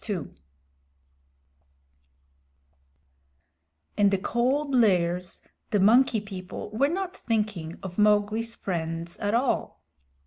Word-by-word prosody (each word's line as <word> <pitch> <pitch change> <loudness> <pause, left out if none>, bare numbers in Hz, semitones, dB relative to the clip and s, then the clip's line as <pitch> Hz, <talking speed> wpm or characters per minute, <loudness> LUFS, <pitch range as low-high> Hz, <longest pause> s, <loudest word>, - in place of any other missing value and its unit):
In 205 -1 +4
the 195 - +1
Cold 265 +8 0
Lairs 180 -6 +2 0.3
the 205 - +1
Monkey 225 +4 +5
People 195 -1 -8
were 250 +6 +2
not 375 +2 -3
thinking 210 - -2
of 190 +1 -6
Mowgli's 210 +2 +2
friends 165 -1 -4
at 205 +2 0
all. 250 +2 -1
210 Hz, 90 wpm, -26 LUFS, 185-235 Hz, 0.3 s, Monkey